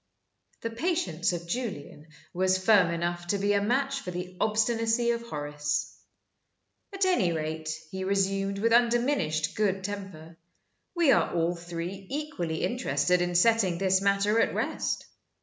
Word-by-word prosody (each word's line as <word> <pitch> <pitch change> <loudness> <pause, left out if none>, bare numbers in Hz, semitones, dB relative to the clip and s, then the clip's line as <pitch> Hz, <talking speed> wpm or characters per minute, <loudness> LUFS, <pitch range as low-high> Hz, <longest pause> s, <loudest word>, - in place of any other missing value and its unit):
The 230 - -3
patience 230 - -1
of 170 -1 -4
Julian 175 - -5 0.3
was 185 +1 +2
firm 185 -2 +4
enough 175 +1 -3
to 200 - +1
be 200 +1 +1
a 200 - +2
match 270 +5 0
for 185 - -7
the 180 +1 -6
obstinacy 225 +2 +2
of 235 0 -2
Horace. 150 -6 -3 1.0
"At 390 -1 0
any 355 - +2
rate," 155 0 -3 0.2
he 190 0 -4
resumed, 195 0 0
with 230 +3 +2
undiminished 235 - +2
good 195 -3 0
temper, 190 -5 -7 0.6
"we 335 -5 +4
are - - +3
all 170 +1 0
three 175 +3 -6
equally 270 - -3
interested 180 - +1
in 175 0 -1
setting 195 -2 +3
this 190 0 +2
matter 200 +2 +2
at - - +1
rest. - - -2
195 Hz, 145 wpm, -28 LUFS, 175-230 Hz, 1.0 s, firm